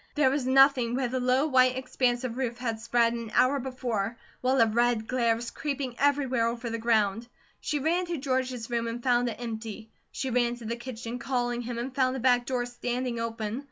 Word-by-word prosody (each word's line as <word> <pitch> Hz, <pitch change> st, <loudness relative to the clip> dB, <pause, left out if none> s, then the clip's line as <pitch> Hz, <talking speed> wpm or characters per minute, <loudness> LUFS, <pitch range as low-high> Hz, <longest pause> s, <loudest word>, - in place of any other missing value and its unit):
There 295 Hz, -3 st, +4 dB
was 275 Hz, -2 st, -1 dB
nothing 260 Hz, -3 st, +5 dB
where 255 Hz, -2 st, 0 dB
the 255 Hz, +1 st, -1 dB
low 255 Hz, +3 st, +2 dB
white 255 Hz, -3 st, +4 dB
expanse 255 Hz, -1 st, 0 dB
of 240 Hz, -2 st, -3 dB
roof 245 Hz, -2 st, -2 dB
had 230 Hz, -3 st, -3 dB
spread 230 Hz, +1 st, +2 dB
an 230 Hz, -1 st, -5 dB
hour 275 Hz, +3 st, +4 dB
before, 240 Hz, -4 st, -3 dB, 0.2 s
while 260 Hz, +1 st, +2 dB
a 230 Hz, -, +7 dB
red 235 Hz, 0 st, +1 dB
glare 235 Hz, -3 st, +2 dB
was 235 Hz, +1 st, -6 dB
creeping 280 Hz, -4 st, -3 dB
everywhere 270 Hz, -4 st, +2 dB
over 235 Hz, 0 st, -3 dB
the 230 Hz, -, -3 dB
ground. 225 Hz, -1 st, +1 dB, 0.3 s
She 300 Hz, -, -2 dB
ran 340 Hz, +5 st, 0 dB
to 340 Hz, -1 st, -2 dB
George's 260 Hz, -3 st, -2 dB
room 235 Hz, -1 st, -1 dB
and 230 Hz, +1 st, -5 dB
found 245 Hz, -1 st, +2 dB
it 215 Hz, -1 st, -7 dB
empty. 220 Hz, -2 st, -6 dB, 0.2 s
She 265 Hz, -2 st, -3 dB
ran 240 Hz, 0 st, +1 dB
to 240 Hz, -1 st, -11 dB
the 230 Hz, +2 st, -2 dB
kitchen, 240 Hz, -1 st, -6 dB
calling 245 Hz, -1 st, -1 dB
him, 240 Hz, 0 st, -5 dB
and 250 Hz, +2 st, -4 dB
found 255 Hz, -1 st, +1 dB
the -, -, -3 dB
back 245 Hz, -1 st, +3 dB
door 250 Hz, -2 st, -1 dB
standing 245 Hz, 0 st, -3 dB
open. 225 Hz, 0 st, -3 dB
245 Hz, 210 wpm, -28 LUFS, 230-260 Hz, 0.3 s, a